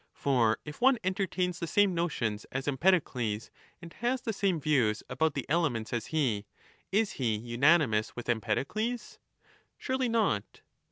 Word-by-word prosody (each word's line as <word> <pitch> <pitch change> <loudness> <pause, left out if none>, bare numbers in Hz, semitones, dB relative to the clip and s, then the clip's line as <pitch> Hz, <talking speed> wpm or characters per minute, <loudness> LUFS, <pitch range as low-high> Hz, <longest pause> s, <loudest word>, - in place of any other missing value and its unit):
15 - - -27
For 120 -6 +3
if 150 0 -9
one 265 0 +5
entertains 185 -2 -1
the 170 - -3
same 200 +3 +3
notions 130 -11 -1
as 135 +2 -3
Empedocles 130 - +1 0.3
and 170 - -10
has 245 +3 0
the 225 - -2
same 195 -4 0
views 125 -8 +1
about 160 -2 +1
the 135 - -3
elements 140 -9 0
as 115 -2 -2
he, 120 -10 0 0.4
is 210 +1 +2
he 115 -5 +1
unanimous 120 0 +2
with 120 - -7
Empedocles? 140 - -2 0.6
Surely 260 -2 -1
not 215 - 0
150 Hz, 150 wpm, -30 LUFS, 120-190 Hz, 0.6 s, one